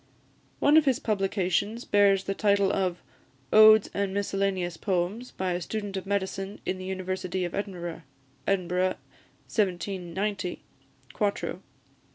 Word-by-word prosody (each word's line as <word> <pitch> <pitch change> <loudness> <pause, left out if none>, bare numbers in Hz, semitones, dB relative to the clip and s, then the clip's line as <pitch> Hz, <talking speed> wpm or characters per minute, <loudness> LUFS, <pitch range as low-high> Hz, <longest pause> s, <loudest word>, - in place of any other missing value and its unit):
One 295 +2 +5
of 315 - +5
his 265 -3 +3
publications 200 +1 -1
bears 200 -2 +4
the 195 - -2
title 200 -1 +2
of 185 -2 -1 0.5
"Odes 215 0 +8
and 200 -1 -1
Miscellaneous 195 -3 -1
Poems, 190 +7 -2
by 185 -1 -3
a 175 +1 -2
Student 205 +2 -4
of 190 0 -5
Medicine 195 0 -2
in 185 - -2
the 185 - -6
University 185 -1 -3
of 175 - -5
Edinburgh," 180 -4 -4 0.5
Edinburgh, 185 -1 +1 0.5
1790, 190 -1 -2 0.5
4to. 205 -2 -1
195 Hz, 125 wpm, -27 LUFS, 185-205 Hz, 0.5 s, Odes